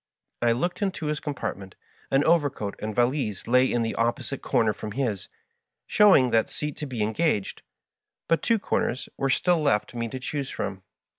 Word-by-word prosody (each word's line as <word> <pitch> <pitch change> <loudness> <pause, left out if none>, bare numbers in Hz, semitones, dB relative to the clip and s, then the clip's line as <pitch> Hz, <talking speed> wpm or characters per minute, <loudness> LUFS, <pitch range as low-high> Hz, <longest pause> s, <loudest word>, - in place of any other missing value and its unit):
I 120 -1 +3
looked 175 - -2
into 190 -5 -2
his 150 0 -1
compartment; 100 - -5 0.3
an 135 +1 +3
overcoat 145 -11 +1
and 105 0 -4
valise 120 -5 0
lay 125 +2 +4
in 120 -1 +1
the 115 - -2
opposite 120 +3 -1
comer 110 -2 +2
from 105 +1 -7
his, 110 -7 -2 0.6
showing 185 - +5
that 115 -1 +2
seat 150 -1 -4
to 150 - -4
be 120 -5 -2
engaged, 110 -1 0 0.7
but 165 - +2
two 230 -1 +3
comers 130 - -1
were 135 - -1
stfll 175 +5 +2
left 135 -8 +1
me 115 -1 -2
to 125 - -6
choose 135 +1 -3
from. 95 -1 -4
130 Hz, 170 wpm, -26 LUFS, 110-150 Hz, 0.7 s, showing